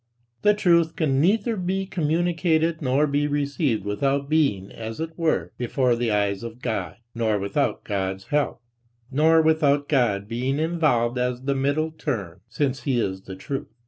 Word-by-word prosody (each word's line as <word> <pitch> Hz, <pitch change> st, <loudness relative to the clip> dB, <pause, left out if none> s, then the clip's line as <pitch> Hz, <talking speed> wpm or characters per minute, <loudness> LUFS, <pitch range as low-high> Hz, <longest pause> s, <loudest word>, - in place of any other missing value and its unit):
The 210 Hz, +6 st, +4 dB
truth 170 Hz, -5 st, +3 dB
can 140 Hz, -4 st, +1 dB
neither 215 Hz, +6 st, +2 dB
be 190 Hz, 0 st, -1 dB
communicated 165 Hz, -1 st, 0 dB
nor 135 Hz, +2 st, +2 dB
be 145 Hz, 0 st, 0 dB
received 140 Hz, -, -1 dB
without 140 Hz, +7 st, 0 dB
being 135 Hz, -12 st, +1 dB
as 110 Hz, 0 st, -7 dB
it 160 Hz, 0 st, -3 dB
were 165 Hz, -2 st, 0 dB
before 125 Hz, 0 st, +1 dB
the 120 Hz, 0 st, -1 dB
eyes 100 Hz, -2 st, 0 dB
of 115 Hz, 0 st, -8 dB
God, 100 Hz, -9 st, -3 dB, 0.2 s
nor 110 Hz, -3 st, +1 dB
without 100 Hz, 0 st, -1 dB
God's 95 Hz, -1 st, -3 dB
help, 145 Hz, -5 st, 0 dB, 0.5 s
nor 160 Hz, +3 st, +4 dB
without 145 Hz, -3 st, +3 dB
God 110 Hz, -8 st, +1 dB
being 125 Hz, +5 st, -1 dB
involved 150 Hz, -7 st, +1 dB
as 125 Hz, 0 st, -1 dB
the 140 Hz, +1 st, +1 dB
middle 145 Hz, +4 st, 0 dB
term, 100 Hz, -, -4 dB
since 135 Hz, +2 st, -1 dB
he 130 Hz, -4 st, 0 dB
is 95 Hz, -3 st, -3 dB
the 95 Hz, -, -7 dB
truth. 135 Hz, +8 st, -5 dB
140 Hz, 160 wpm, -24 LUFS, 115-160 Hz, 0.5 s, The